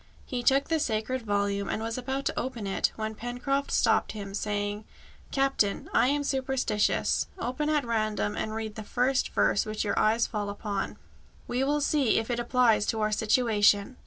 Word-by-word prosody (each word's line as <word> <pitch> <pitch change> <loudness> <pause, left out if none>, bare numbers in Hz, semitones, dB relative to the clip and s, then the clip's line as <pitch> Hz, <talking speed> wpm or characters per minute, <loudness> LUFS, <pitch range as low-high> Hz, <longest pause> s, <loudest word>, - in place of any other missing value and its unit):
He 250 -2 -3
took 270 +3 +3
the 325 -1 +1
sacred 235 0 -1
volume, 200 -2 -1
and - - -1
was 225 0 -3
about 265 +2 -3
to - - -1
open 240 -5 -4
it, 195 - 0
when 220 0 -3
Pencroft 245 +5 -2
stopped - - +2
him, 200 -2 -7
saying, 205 0 -2 0.5
"Captain, 270 -7 0
I - - +4
am 285 +2 +1
superstitious. 265 -6 0
Open 300 -1 -2
at 300 -3 +1
random 215 -3 -1
and 215 0 -3
read 220 -1 -4
the 220 - -7
first 250 +4 +1
verse - - +2
which 215 -1 -3
your 205 - 0
eye 215 +1 +3
falls 210 -3 -1
upon. 200 -1 -4 0.5
We 250 +2 0
will 290 +2 +1
see 285 -5 +2
if 225 +2 -1
it 240 - -1
applies 240 -3 +3
to 220 - 0
our 215 0 +1
situation." 215 0 +2
225 Hz, 180 wpm, -28 LUFS, 210-260 Hz, 0.5 s, I